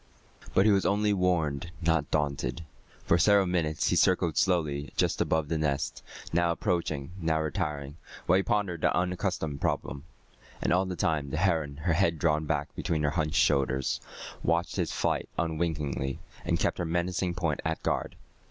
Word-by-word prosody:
But 95 - +5
he 110 - +6
was 100 -1 +3
only 105 +1 +2
warned, 85 -5 0
not 80 -3 +1
daunted. 75 +2 -1 0.4
For 85 - +3
several 100 +1 +5
minutes 85 -4 0
he - - +2
circled 90 -3 +3
slowly 75 -6 +1
just - - +1
above 80 -2 +1
the 80 +1 -1
nest, 70 -2 -1 0.3
now 85 0 +3
approaching, 80 -5 -1
now 80 -1 +1
retiring, 75 -3 -3 0.3
while 90 - +4
he - - +3
pondered 100 -6 -1
the - - +3
unaccustomed 85 -5 -1
problem. 70 +2 -2 0.5
And - - +1
all 90 +2 +3
the 90 - -3
time 75 -4 0
the 80 - -3
heron, 80 -5 +1
her 85 - +2
head 85 -1 +2
drawn 75 0 +1
back 75 -1 -2
between 80 -2 -1
her 75 - +2
hunched 75 -2 -1
shoulders, 65 -1 +2 0.4
watched 85 +1 0
his - - 0
flight - - -1
unwinkingly, 75 -5 -1 0.3
and - - +1
kept - - 0
her 90 - -1
menacing 85 +1 -1
point 85 -4 -1
at 80 0 -2
guard. - - -1
80 Hz, 170 wpm, -29 LUFS, 75-90 Hz, 0.5 s, he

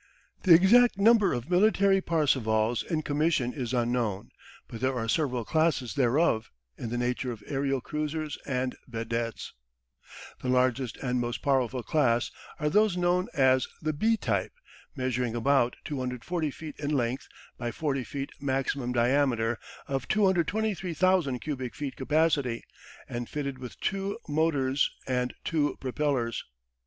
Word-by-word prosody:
The 175 -4 +8
exact 220 +6 +6
number 210 -1 +5
of 120 +2 -3
military 195 +1 +4
Parsevals 120 -9 +1
in 155 -2 -2
commission 145 -4 +1
is 125 -5 -4
unknown, 120 -5 -1 0.4
but 115 - -8
there 130 0 +1
are 115 -2 -2
several 125 -3 0
classes 155 -6 +1
thereof, 130 -2 +2 0.3
in 115 - -5
the 120 - -2
nature 125 +1 -1
of 110 -3 -9
aerial 135 -1 -1
cruisers 150 +1 -3
and 130 -2 -1
vedettes. 115 -1 -4 0.9
The 130 - -2
largest 125 -1 +1
and 125 -1 0
most 120 0 -3
powerful 130 -3 +1
class 120 -6 +1 0.3
are 150 - 0
those 205 +3 +3
known 180 +1 +2
as 130 -2 +4
the 155 -1 -1
B 225 +9 +2
type, 100 - -1 0.4
measuring 125 -2 -1
about 125 0 +2
240 140 +4 -2
feet 155 +2 -9
in 145 -1 -2
length 130 -3 -1 0.3
by 120 - -2
40 135 +1 -2
feet 140 +1 -5
maximum 135 -2 -1
diameter, 120 -2 +2 0.3
of 135 -2 -2
223,000 185 -5 +1
cubic 130 -2 -5
feet 145 -2 -4
capacity, 140 -4 +1 0.4
and 120 -1 -5
fitted 140 -3 -4
with 125 -2 -9
two 195 +1 -2
motorsand 135 -4 0
two 150 -3 0
propellers. 130 -3 -1
135 Hz, 135 wpm, -28 LUFS, 125-160 Hz, 0.9 s, The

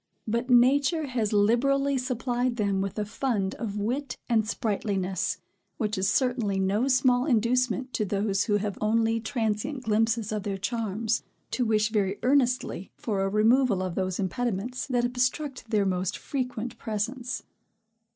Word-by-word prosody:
But 235 +4 -1
nature 280 +6 +4
has 240 -6 -1
liberally 275 +7 +3
supplied 250 -1 -1
them 200 -4 0
with 195 +1 -3
a 210 - -1
fund 210 -4 -1
of 210 -3 -3
wit 245 +6 -2
and 220 -2 +2
sprightliness, 195 -4 -1 0.4
which 215 -3 -1
is 190 +1 +1
certainly 235 -4 +1
no 200 +6 +1
small 255 0 +3
inducement 250 +1 +1
to 215 - 0
those, 200 0 0
who 205 -2 +2
have 205 -1 -3
only 225 +1 +2
transient 225 +3 -2
glimpses 225 0 +1
of 215 -1 -1
their 200 -1 -3
charms, 220 +1 -1 0.3
to 250 - 0
wish 215 -1 +2
very 200 -2 0
earnestly 250 -7 +1
for 205 -4 -2
a 195 - +1
removal 215 0 +3
of 185 -2 -3
those 185 0 -1
impediments, 240 +6 -2
that 245 -3 +1
obstruct 255 +1 -1
their 210 -2 +2
more 185 -1 0
frequent 250 +3 -3
presence. 240 +4 -3
225 Hz, 150 wpm, -27 LUFS, 205-250 Hz, 0.4 s, nature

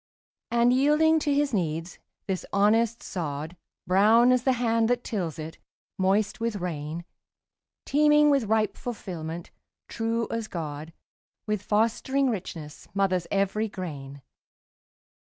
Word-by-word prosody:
And 235 +1 +3
yielding 300 +4 +4
to 295 - -1
his 285 -1 +1
needs, 165 -2 -2 0.3
this 190 -2 -2
honest 225 +3 +2
sod, 155 -2 -4 0.3
Brown 220 +7 +5
as 255 -1 +3
the 260 +1 +2
hand 230 -2 +1
that 245 0 +1
tills 180 - -3
it, 160 0 -7 0.4
moist 195 +2 +1
with 230 -1 -1
rain, 170 -3 -4 0.8
Teeming 295 0 +4
with 275 -5 +2
ripe 215 0 +1
fulfilment, 175 -8 -6 0.4
true 230 0 -1
as 230 -1 -3
God, 155 -3 -6 0.5
With 210 -2 -1
fostering 230 +6 +1
richness, 165 -7 -7
mothers 185 -3 +1
every 200 +2 0
grain. 140 -8 -7
210 Hz, 120 wpm, -26 LUFS, 170-235 Hz, 0.8 s, Brown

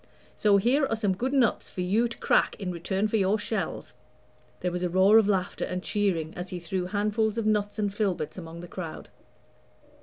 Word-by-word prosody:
So 205 -2 +4
here 265 +8 +2
are 225 - 0
some 210 -3 +1
good 250 +7 -2
nuts 260 -5 +2
for 180 - -5
you 210 +7 +2
to 235 - -9
crack - - +2
in 185 -2 -4
return 190 +4 -1
for 220 - 0
your 200 +1 +2
shells." 215 +1 -3 0.7
There 180 - -1
was 175 0 -3
a 180 - 0
roar 190 +5 +6
of 215 - +2
laughter 195 -2 0
and 180 0 -3
cheering 185 -7 0
as 180 +1 -6
he 180 - -5
threw 180 +2 -3
handfuls 210 +2 0
of 230 - -1
nuts 210 -1 0
and 205 -2 -1
filberts 190 -7 -1
among 170 -2 -8
the 175 - -9
crowd. 170 -3 -7
200 Hz, 205 wpm, -27 LUFS, 180-215 Hz, 0.7 s, roar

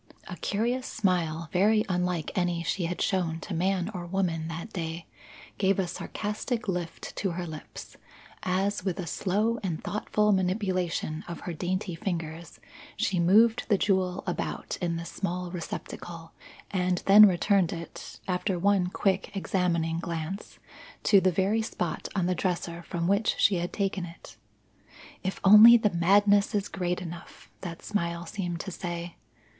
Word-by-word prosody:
A - - -6
curious 240 +5 -1
smile, 170 -6 0
very 215 +4 +4
unlike 180 -3 -1
any 175 -2 0
she 175 +1 -1
had 175 +1 -2
shown 175 -5 0
to 205 - -6
man 180 +1 0
or 175 -2 -5
woman 170 -4 -1
that 165 +6 -6
day, 165 -2 -4 0.5
gave 195 -1 +3
a 190 - +1
sarcastic 215 +6 -4
lift 180 -3 -4
to 195 - 0
her 175 +1 -4
lips, 155 -2 -9 0.4
as 190 +2 0
with 185 -3 -1
a 180 - -3
slow 210 +7 0
and 175 -6 -3
thoughtful 210 0 +1
manipulation 185 -4 0
of 170 -2 -7
her 175 - -5
dainty 185 +3 -2
fingers 165 -2 -5 0.4
she 185 - 0
moved 220 +7 +4
the 205 - +4
jewel 185 -2 +1
about - - -3
in 170 -2 0
this 165 0 -5
small 180 -2 -3
receptacle 170 -1 -7 0.4
and 180 -2 0
then 210 +2 +9
returned 185 0 +2
it, 170 -1 -8
after 185 +1 0
one 195 0 +2
quick 190 +1 0
examining 170 -4 0
glance, 170 +3 -5 0.5
to 200 -3 +6
the 185 - +3
very 195 +5 +1
spot 180 -6 -3
on 185 -3 +1
the 180 - +1
dresser 170 -1 -2
from 170 0 -3
which 200 +3 +2
she 200 -2 +4
had 175 +1 -2
taken 195 -3 -1
it. 170 0 -12 0.9
"If 190 -1 -3
only 215 +4 +10
the 215 -3 +1
madness 200 +4 +4
is 205 -1 -1
great 180 -1 -2
enough!" 170 -1 -10
that 170 -3 -7
smile 170 -4 -2
seemed 175 -1 -4
to 190 - -6
say. 170 -1 -5
180 Hz, 155 wpm, -28 LUFS, 170-200 Hz, 0.9 s, only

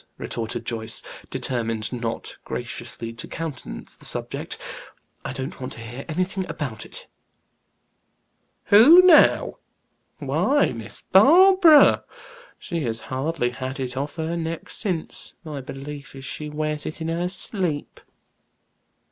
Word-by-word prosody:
retorted 115 -1 -4
Joyce, 115 -1 -3 0.3
determined 115 -2 -2
not 115 -2 -4
graciously 115 0 -5
to 115 - -8
countenance 160 -6 -6
the - - -17
subject. - - -1 0.7
"I - - -4
don't 135 0 -6
want 130 - -5
to - - -11
hear 120 +4 -8
anything 185 +4 -1
about 130 -8 -5
it." - - -9 1.6
"'Who,' 285 - +8
now! 355 -4 +5 0.6
Why, 290 +1 +2
Miss 115 -3 -5
Barbara. 330 - +7 0.5
She 170 -2 -4
has 115 -1 -2
hardly 130 -2 -1
had 130 +2 -5
it 125 -1 -3
off 140 +2 -4
her 160 0 -2
neck 165 -1 -4
since, 180 -7 -3
my 150 -4 -6
belief 140 +1 -8
is 135 0 -9
she 150 +1 -5
wears 150 0 -3
it 155 - -6
in 160 - -4
her 170 +2 -1
sleep." 180 -5 -2
150 Hz, 125 wpm, -23 LUFS, 125-180 Hz, 1.6 s, Who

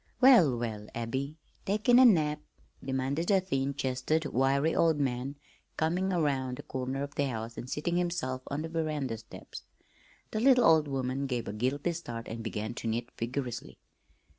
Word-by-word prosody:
"Well, 225 - +7
well, 110 -3 -4
Abby, 130 +6 -3 0.3
takin' 215 +5 +4
a 260 - +9
nap?" 155 -9 +4 0.4
demanded 135 +5 -1
a 195 -2 +5
thin 140 -7 -1
chested, 140 +4 0
wiry 140 +4 +2
old 160 -3 +3
man 135 0 -1 0.4
coming 180 +4 +1
around 135 -7 0
the - - -8
corner 130 +1 -3
of 140 0 -6
the 145 - 0
house 115 -2 -5
and 125 - -7
seating 170 +5 -1
himself 170 -8 -1
on 145 +2 -3
the 165 - -5
veranda 150 -8 -2
steps. - - -10 0.7
The 215 - -1
little 250 0 +5
old 160 -2 +5
woman 135 0 -2
gave 125 -3 -2
a - - -4
guilty 135 +9 -1
start 120 -9 -6
and 115 +1 -5
began 110 0 -3
to 120 - -5
knit 115 +2 -2
vigorously. 120 - -4
140 Hz, 165 wpm, -30 LUFS, 125-160 Hz, 0.7 s, a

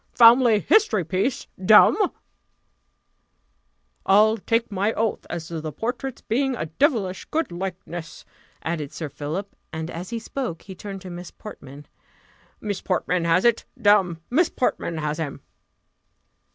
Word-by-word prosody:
family 235 -2 +7
history 230 - +3
piece, 190 - -1 0.2
damme!" 220 - +6 1.9
"I'll 215 +3 +5
take 230 +2 0
my 200 +3 0
oath 220 -1 -2
as 170 -2 -5
to 165 -2 -4
the 155 0 -5
portrait's 245 - -4
being 265 +3 0
a 155 - -3
devilish 190 - 0
good 320 - -2
likeness," 175 -2 -6 0.4
added 155 -4 -3
Sir 155 -1 -5
Philip; 155 +8 -5 0.2
and 160 +1 -5
as 175 +3 -6
he 235 - -3
spoke, 230 -6 -5
he 195 - -9
turned 195 0 -8
to 185 -1 -8
Miss 175 0 -7
Portman: 145 -8 -11 0.7
"Miss 205 -3 -4
Portman 180 -2 0
has 170 +4 +3
it! 235 -1 +3
damme, 195 -5 +4
Miss 320 +6 +3
Portman 170 -9 -1
has 150 0 -2
him!" 145 -3 -5
190 Hz, 140 wpm, -24 LUFS, 165-230 Hz, 1.9 s, family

